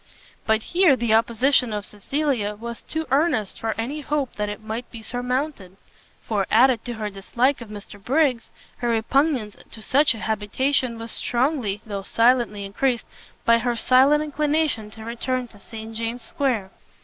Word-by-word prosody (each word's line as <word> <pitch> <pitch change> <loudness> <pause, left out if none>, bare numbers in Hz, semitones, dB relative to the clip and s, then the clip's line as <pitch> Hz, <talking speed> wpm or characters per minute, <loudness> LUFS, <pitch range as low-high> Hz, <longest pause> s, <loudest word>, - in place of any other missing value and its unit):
But 220 0 +3
here 350 -5 +4
the 235 -3 0
opposition 235 +2 +3
of 210 -1 -3
Cecilia 220 -1 -1
was 235 +2 -7
too 320 0 -4
earnest 270 - +1
for 225 -1 -2
any 275 +7 -3
hope 290 -2 -1
that 210 0 -1
it 210 +1 -7
might 220 +3 -5
be 225 -1 -10
surmounted; 245 -5 -3 0.5
for, 205 -4 -1
added 245 0 +4
to 240 - -3
her 215 -1 -4
dislike 240 +7 0
of 230 - -9
Mr 205 -1 -10
Briggs, 265 -3 +1 0.3
her 240 - -1
repugnance 235 0 +1
to 225 - -9
such 280 +1 +3
an 220 - -8
habitation 230 +4 0
was 225 0 -6
strongly, 240 -5 0
though 200 -3 -4
silently 230 -1 +2
increased, 235 +4 0 0.4
by 230 0 +5
her 240 0 0
secret 260 +5 +5
inclination 300 -6 0
to 220 +1 -11
return 245 +2 -2
to 205 - -15
St 220 +1 -9
James's 230 +2 -3
square. 235 -9 -1
235 Hz, 160 wpm, -23 LUFS, 215-270 Hz, 0.5 s, by